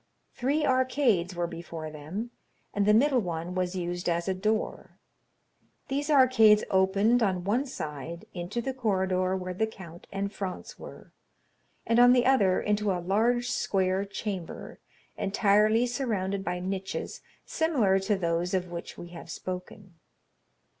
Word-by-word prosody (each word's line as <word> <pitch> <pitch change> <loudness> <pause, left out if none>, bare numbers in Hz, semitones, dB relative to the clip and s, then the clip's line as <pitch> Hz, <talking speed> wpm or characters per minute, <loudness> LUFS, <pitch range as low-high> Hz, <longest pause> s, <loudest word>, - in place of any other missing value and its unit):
Three 290 +5 0
arcades 255 -9 +2
were 175 0 -1
before 165 -2 -7
them, 165 +11 -6 0.4
and 205 0 +1
the 210 - +6
middle 265 +2 +4
one 175 -3 -4
was 185 0 -1
used 175 0 -2
as 170 +1 -1
a 190 - +1
door. 215 +4 -2 0.9
These 285 +3 -2
arcades 255 -7 +6
opened 195 +5 +3
on 185 -4 +1
one 235 +9 0
side 160 - -6
into 180 +6 -4
the 265 - -2
corridor 190 -6 0
where 185 0 -5
the 220 +5 0
count 175 -6 -12
and 200 +1 -3
Franz 190 -2 -6
were, - - -12 0.7
and 230 +1 +3
on 245 0 +8
the 245 -1 +3
other 205 -9 +4
into 210 0 0
a 185 - 0
large 230 +7 +1
square 190 0 0
chamber, 195 -3 -6 0.4
entirely 210 +3 +3
surrounded 210 -6 -2
by 180 -1 -2
niches 190 +1 -4 0.2
similar 245 -13 +2
to 200 +2 0
those 175 0 0
of 180 -1 -2
which 170 0 -7
we 175 - -9
have 170 -1 -10
spoken. 180 0 -7
195 Hz, 145 wpm, -28 LUFS, 180-230 Hz, 0.9 s, on